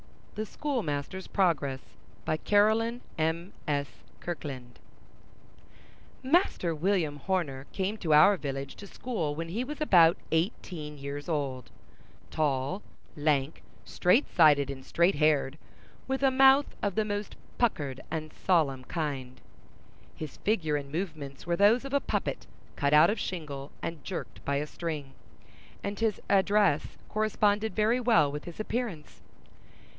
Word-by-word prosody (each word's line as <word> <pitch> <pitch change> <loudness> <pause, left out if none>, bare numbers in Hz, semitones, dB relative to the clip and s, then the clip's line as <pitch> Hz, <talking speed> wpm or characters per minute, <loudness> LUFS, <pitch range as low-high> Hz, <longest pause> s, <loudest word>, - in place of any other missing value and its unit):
THE 215 - -3
SCHOOLMASTER'S 190 - -3
PROGRESS 150 -9 +1 0.4
By 155 - 0
Caroline 220 +6 +2 0.2
M.S. 160 -3 -1 0.3
Kirkland 135 -8 -6 1.4
(1801–1864) 260 - -6
Master 325 - +3
William 160 -2 0
Horner 145 -5 -2
came 195 +2 -1
to 165 -6 -2
our 195 +7 +7
village 135 -3 -5
to 200 - -10
school 180 -12 -3
when 165 +1 -4
he 220 +8 -2
was 300 +4 -6
about 175 - +6
eighteen 160 -3 -2
years 140 +2 -6
old: 135 -6 -2 0.6
tall, 145 +4 0 0.3
lank, 145 -1 0 0.2
straight 185 +11 +3
sided, 145 -5 +5
and 135 -1 -8
straight 170 +7 +2
haired, 150 -1 +2 0.5
with 265 +1 -1
a 270 - +5
mouth 270 +2 +5
of 200 -3 -1
the 215 - +1
most 205 -1 -4 0.2
puckered 145 - 0
and 155 -1 -4
solemn 145 -8 +1
kind. 140 -6 -4 0.8
His 155 -3 -7
figure 165 -8 0
and 140 -1 -7
movements 155 -5 -5
were 170 0 0
those 220 +7 +4
of 275 - -6
a 280 - +4
puppet - - -3 0.3
cut 140 -1 +1
out 155 +5 +7
of 220 - -3
shingle 145 -6 -5
and 165 -3 -5
jerked - - -6
by 140 - 0
a 145 +1 0
string; 150 -4 -5 0.7
and 200 0 -4
his 225 -3 +1
address 200 -5 +2
corresponded 215 0 +1
very 225 +3 +3
well 225 - +4
with 150 +1 -6
his 175 +2 -9
appearance. 215 -8 -4
165 Hz, 135 wpm, -29 LUFS, 145-210 Hz, 1.4 s, our